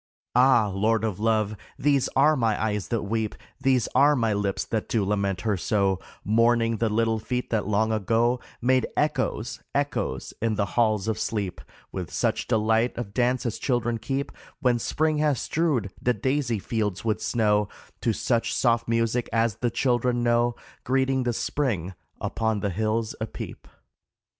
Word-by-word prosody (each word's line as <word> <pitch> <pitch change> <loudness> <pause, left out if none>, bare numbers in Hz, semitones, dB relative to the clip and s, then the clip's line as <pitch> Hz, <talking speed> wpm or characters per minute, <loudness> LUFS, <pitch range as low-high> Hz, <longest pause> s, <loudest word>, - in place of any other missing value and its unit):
Ah! 125 -3 +5
Lord 110 +3 +1
of 105 -4 -2
Love, 110 -1 +1 0.2
these 140 -2 +2
are 150 +3 +5
my 115 -5 +1
eyes 105 -2 -1
that 115 -3 -1
weep, 110 +1 -2 0.3
These 130 -3 +2
are 145 +2 +5
my 115 -4 +1
lips 100 -1 -1
that 110 -2 -3
do 110 -4 +1
lament 100 -2 0
her 105 +1 +1
so, 95 0 +1 0.3
Mourning 115 +1 +3
the 115 +1 +1
little 115 +1 +1
feet 125 +3 -3
that 110 -4 0
long 110 +1 +2
ago 115 +4 +1 0.2
Made 130 +1 +3
echoes, 130 -6 -1
echoes, 145 0 -1
in 115 -1 +1
the 100 -1 +1
halls 110 -4 +2
of 110 -1 -1
sleep, 100 - -2 0.3
With 90 -3 -5
such 110 -2 0
delight 110 +1 +2
of 110 -4 -5
dance 125 0 +1
as 115 - -2
children 120 -3 0
keep 135 +2 -3 0.3
When 125 -2 +2
spring 155 +5 0
has 150 -4 +2
strewed 145 - 0
the 125 0 +2
daisy 130 +1 0
fields 105 -1 -2
with 110 -2 0
snow, 105 -3 +1 0.3
To 115 - +2
such 115 +2 0
soft 115 -1 +2
music 115 +1 0
as 115 -2 +1
the 120 - 0
children 120 0 +1
know 120 0 +2 0.3
Greeting 130 +1 +1
the 120 - +2
spring, 105 - -1 0.3
upon 110 -2 -1
the 100 - -1
hills 110 +3 -1
a 110 - -1
peep. - - -8
115 Hz, 165 wpm, -26 LUFS, 105-125 Hz, 0.3 s, Ah